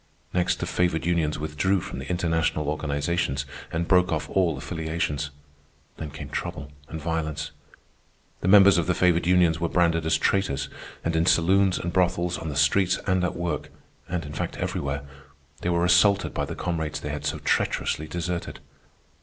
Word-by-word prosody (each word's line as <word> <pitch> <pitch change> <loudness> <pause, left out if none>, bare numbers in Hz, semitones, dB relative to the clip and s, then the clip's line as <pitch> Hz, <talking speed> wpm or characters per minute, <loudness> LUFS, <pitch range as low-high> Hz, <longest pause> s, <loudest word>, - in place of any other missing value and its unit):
Next, 90 -1 +1
the - - -2
favored 85 -3 0
unions 85 -3 +1
withdrew 75 +6 0
from - - -6
the - - -7
international 80 -4 0
organizations 75 -2 -1 0.3
and 85 +1 -1
broke 90 0 +4
off 80 -1 -1
all 90 -6 +2
affiliations. 80 -1 -2 0.7
Then 80 - -5
came 75 -1 -8
trouble 70 0 -5 0.2
and 80 - -5
violence. 80 -2 -3 0.9
The - - -3
members 100 -1 +7
of 85 - -1
the 90 - +2
favored 85 -1 +3
unions 90 -3 +4
were 85 -1 0
branded 85 -2 +2
as 80 - +3
traitors, 70 -8 0 0.4
and 80 0 0
in 80 +1 +2
saloons 95 +3 +4
and 85 0 -4
brothels, 90 -1 +1
on 80 - -5
the 75 - -4
streets 90 +7 +3
and 95 -1 +1
at 90 - -1
work, 85 -2 -3 0.4
and, 90 -3 -2
in 75 - -7
fact, - - -4
everywhere, 70 0 -2 0.6
they 90 - -2
were 85 0 +2
assaulted 100 +3 +4
by - - -1
the - - -6
comrades 80 -4 -2
they 75 - -5
had 75 0 -5
so 75 - -1
treacherously 80 - 0
deserted. 85 +2 -4
85 Hz, 170 wpm, -25 LUFS, 75-90 Hz, 0.9 s, members